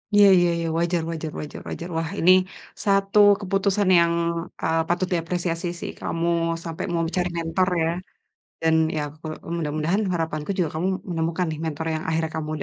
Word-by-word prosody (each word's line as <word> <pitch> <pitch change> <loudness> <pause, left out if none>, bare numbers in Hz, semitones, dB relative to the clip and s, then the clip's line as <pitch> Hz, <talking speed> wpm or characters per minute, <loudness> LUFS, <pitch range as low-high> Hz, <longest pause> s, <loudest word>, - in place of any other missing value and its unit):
Iya 205 -1 +8
iya 175 0 +3
iya, 165 - -2
wajar 170 0 +1
wajar 160 -2 -4
wajar 150 - -7
wajar. 170 - -5
Wah 165 0 -1
ini 180 +2 +6 0.5
satu 195 0 +3 0.2
keputusan 195 0 +1
yang, 170 0 +3 0.5
eee, 165 0 +2
patut 175 +1 0
diapresiasi 175 0 -1
sih, - - -5
kamu 165 +1 -2 0.4
sampai 165 -1 -4
mau 165 0 +1
cari 180 -1 +1
mentor 165 +3 +1 0.2
ya, 165 - +1 0.7
dan 160 0 +3 0.2
ya 150 - 0 0.2
kalau 155 -1 -6 0.2
mudah-mudahan 160 +5 0
harapanku 160 0 -2
juga 170 -4 +2
kamu 180 - 0 0.2
menemukan 165 +2 -1
nih 155 - -5
mentor 160 0 -3
yang 155 - -3
akhirnya 160 0 0
kamu 155 -1 -3
165 Hz, 165 wpm, -24 LUFS, 160-180 Hz, 0.7 s, Iya